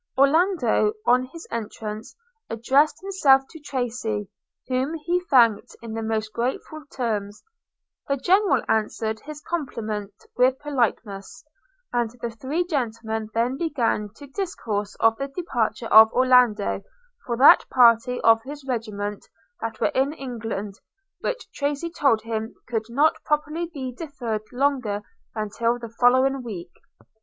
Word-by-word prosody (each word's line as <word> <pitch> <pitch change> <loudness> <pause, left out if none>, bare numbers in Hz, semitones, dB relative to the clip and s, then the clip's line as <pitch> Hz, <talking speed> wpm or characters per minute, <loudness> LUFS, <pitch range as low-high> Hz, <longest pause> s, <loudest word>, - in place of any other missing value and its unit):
Orlando, 320 - +3
on 250 +1 +4
his 330 +6 -11
entrance, 215 -1 -6 0.3
addressed 265 +7 +2
himself 290 -9 +4
to 320 - -11
Tracy, 235 -7 -3 0.4
whom 260 +5 -1
he 345 +3 0
thanked 230 -6 +4
in 230 -1 -8
the 225 - -3
most 220 -1 -2
graceful 265 +5 -3
terms. 210 -5 -3 0.6
The 275 - 0
General 355 - +3
answered 220 0 -1
his 300 +4 -9
compliment 220 -11 -4 0.2
with 255 +1 +3
politeness, 240 -6 -2 0.5
and 240 -2 +1
the 235 0 -4
three 275 +10 -2
gentlemen 225 - -3
then 240 +3 +1
began 250 -10 0
to 290 - -11
discourse 230 - -4
of 225 0 +4
the 275 - -3
departure 270 -7 -2
of 220 +1 +9
Orlando 250 -6 +3 0.5
for 235 -1 -1
that 265 - +7
party 245 0 +4
of 225 0 +5
his 285 +3 -9
regiment 210 -4 -4 0.3
that 225 -1 -4
were - - +1
in 270 +3 +1
England, 225 -7 -5 0.4
which - - -3
Tracy 290 +4 -2
told 250 -9 +2
him 225 0 -4
could 225 -2 -2
not 290 +7 +2
properly 300 +3 -1
be 260 -5 -5
deferred 235 -7 -5
longer 250 -6 0 0.3
than 215 -2 -3
till 230 +3 0
the 235 -1 -8
following 260 +2 +4
week. 185 -8 -7
245 Hz, 135 wpm, -24 LUFS, 220-280 Hz, 0.6 s, of